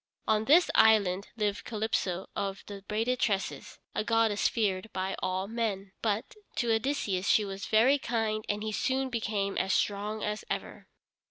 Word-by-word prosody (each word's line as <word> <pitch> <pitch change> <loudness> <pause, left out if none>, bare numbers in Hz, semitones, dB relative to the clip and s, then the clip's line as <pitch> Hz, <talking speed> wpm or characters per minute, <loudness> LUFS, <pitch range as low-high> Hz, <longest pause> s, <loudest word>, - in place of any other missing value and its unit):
On 215 0 +2
this 330 +7 +5
island 200 -3 +4
lived 210 -2 -1
Calypso 210 -5 -2
of 195 -1 -3
the 200 -1 -8
braided 230 +4 0
tresses, 200 -3 -1 0.2
a - - -1
goddess 225 -2 +2
feared 205 -2 -1
by 190 +1 -2
all 185 +1 -1
men. 205 -4 -2
But, 215 0 -1 0.2
to 235 -2 +1
Odysseus 220 -6 -1
she 210 - +4
was 195 0 -6
very 250 +6 +4
kind 220 -3 -1
and 205 0 -1
he 220 - -2
soon 265 +4 0
became 210 -4 -1
as 190 - +1
strong 210 +1 -1
as 210 0 -2
ever. - - -5
215 Hz, 160 wpm, -30 LUFS, 200-225 Hz, 0.2 s, this